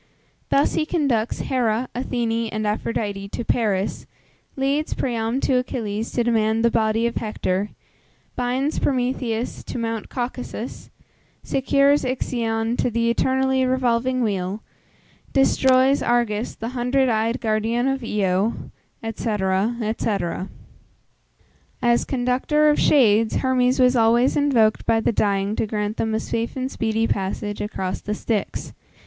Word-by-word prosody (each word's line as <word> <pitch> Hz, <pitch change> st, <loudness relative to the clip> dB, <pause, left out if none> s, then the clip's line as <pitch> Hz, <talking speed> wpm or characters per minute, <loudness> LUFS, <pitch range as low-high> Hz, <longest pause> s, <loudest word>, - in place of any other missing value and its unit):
Thus 280 Hz, -, +3 dB
he -, -, +1 dB
conducts 280 Hz, -9 st, 0 dB
Hera, 245 Hz, -2 st, 0 dB
Athene, 230 Hz, -2 st, -1 dB
and 215 Hz, 0 st, -2 dB
Aphrodite 210 Hz, -2 st, -2 dB
to 235 Hz, -, -5 dB
Paris, 205 Hz, -5 st, 0 dB, 0.5 s
leads 280 Hz, +3 st, 0 dB
Priam 235 Hz, 0 st, -1 dB
to 255 Hz, -2 st, +2 dB
Achilles 225 Hz, -3 st, -3 dB
to 240 Hz, -, +1 dB
demand 225 Hz, -1 st, +2 dB
the 235 Hz, -, +4 dB
body 220 Hz, +1 st, +1 dB
of 235 Hz, -, -1 dB
Hector, 205 Hz, -3 st, -2 dB, 0.7 s
binds 255 Hz, +4 st, -1 dB
Prometheus 245 Hz, -3 st, -1 dB
to -, -, -5 dB
Mount 225 Hz, -2 st, -3 dB
Caucasus, 245 Hz, -1 st, -5 dB, 0.5 s
secures 280 Hz, +2 st, +2 dB
Ixion 235 Hz, -2 st, -1 dB
to -, -, +1 dB
the 235 Hz, 0 st, +1 dB
eternally 265 Hz, +1 st, +1 dB
revolving 255 Hz, 0 st, +1 dB
wheel, 195 Hz, -1 st, -2 dB, 0.7 s
destroys 265 Hz, 0 st, +4 dB
Argus, 235 Hz, -2 st, 0 dB
the 225 Hz, -, -5 dB
hundred 255 Hz, +2 st, +1 dB
eyed 225 Hz, +1 st, 0 dB
guardian 225 Hz, +2 st, 0 dB
of 270 Hz, -1 st, -1 dB
Io, 205 Hz, -1 st, 0 dB, 0.5 s
&c. 225 Hz, -, -2 dB
&c. 215 Hz, +1 st, -1 dB, 1.7 s
As 240 Hz, 0 st, +3 dB
conductor 265 Hz, +4 st, +2 dB
of 295 Hz, -, +1 dB
shades, 225 Hz, -6 st, +4 dB
Hermes 255 Hz, -1 st, +2 dB
was 250 Hz, 0 st, +5 dB
always 235 Hz, +2 st, +4 dB
invoked 250 Hz, -7 st, +2 dB
by 225 Hz, -, +3 dB
the 225 Hz, -, +1 dB
dying 200 Hz, -1 st, 0 dB
to -, -, 0 dB
grant 210 Hz, 0 st, -2 dB
them 220 Hz, -1 st, 0 dB
a -, -, +1 dB
safe 230 Hz, +1 st, -3 dB
and 260 Hz, 0 st, -3 dB
speedy 225 Hz, 0 st, 0 dB
passage 205 Hz, +1 st, -2 dB
across 190 Hz, -3 st, -3 dB
the 210 Hz, -, -3 dB
Styx. 210 Hz, -2 st, -3 dB
230 Hz, 130 wpm, -22 LUFS, 215-255 Hz, 1.7 s, was